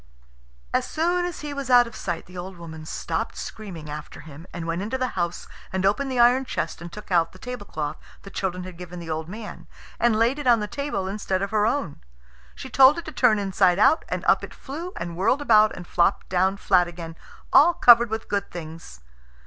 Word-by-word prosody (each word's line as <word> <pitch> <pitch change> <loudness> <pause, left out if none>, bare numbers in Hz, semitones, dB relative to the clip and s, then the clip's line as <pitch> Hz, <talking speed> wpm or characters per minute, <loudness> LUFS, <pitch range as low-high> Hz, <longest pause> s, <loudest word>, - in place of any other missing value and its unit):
As - - +1
soon 350 +3 0
as 355 -2 -5
he 295 -1 -5
was 280 -2 -5
out 245 -1 +7
of 230 -1 -10
sight 175 -3 -4
the 180 - -15
old 180 +1 -7
woman 160 -2 -9
stopped - - -3
screaming 180 -8 -8
after 150 0 -8
him, 155 +3 -12
and 170 -1 -6
went 165 +2 -2
into 220 +6 -2
the 255 -1 -1
house 175 -4 -3 0.2
and 190 0 -1
opened 265 +8 +1
the 255 - -2
iron 245 +2 +5
chest 165 -11 -4
and 170 0 -8
took 210 +1 -11
out 170 -2 +2
the - - -13
tablecloth 205 -10 -5 0.3
the 195 - -11
children 185 -2 -3
had 180 -2 -9
given 180 0 -8
the 170 -2 -6
old 160 +1 -4
man, 210 +2 -9 0.3
and 235 -2 +3
laid 235 +6 +2
it 290 - -4
on 235 -2 +6
the 210 - -2
table 210 -5 -3
instead 195 -1 -2
of 195 - -3
her 215 -1 +2
own. 225 - -2 0.5
She - - -8
told 270 +3 +6
it 340 - -5
to 315 - -6
turn 245 -7 +3
inside 190 -2 +2
out, 300 +10 +4
and - - -3
up - - +4
it - - -8
flew 325 +7 -7
and 170 -1 -5
whirled 195 +10 +2
about 215 -6 +5
and 180 - -8
flopped 170 0 +1
down 190 +2 +1
flat 180 -3 +3
again, 165 -1 -8 0.4
all 325 +5 +7
covered 235 -1 +7
with 220 +1 -4
good 200 -1 -2
things. 165 - -9
195 Hz, 220 wpm, -24 LUFS, 175-245 Hz, 0.5 s, out